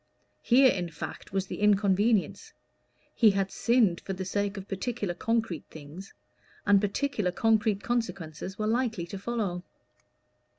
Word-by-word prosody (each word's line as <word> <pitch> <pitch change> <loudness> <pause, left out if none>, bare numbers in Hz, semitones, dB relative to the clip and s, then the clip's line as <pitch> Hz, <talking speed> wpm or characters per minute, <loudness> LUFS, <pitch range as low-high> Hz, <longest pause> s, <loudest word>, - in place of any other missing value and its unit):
Here, 260 +1 +5
in 175 -2 -3
fact, 165 - -8
was 195 0 -1
the - - -7
inconvenience: 205 +1 +2 0.6
he 225 - +5
had 195 -1 0
sinned 230 -8 +2
for 195 - -5
the 190 0 -5
sake 200 +1 -2
of 195 0 -7
particular 205 -1 -3
concrete 225 -3 -2
things, 160 +6 -11 0.5
and 200 -1 +5
particular 210 -2 -1
concrete 215 0 +1
consequences 190 -7 -3
were 215 - -2
likely 225 -5 0
to 190 +3 -7
follow. 200 -5 -2
200 Hz, 135 wpm, -28 LUFS, 185-225 Hz, 0.6 s, Here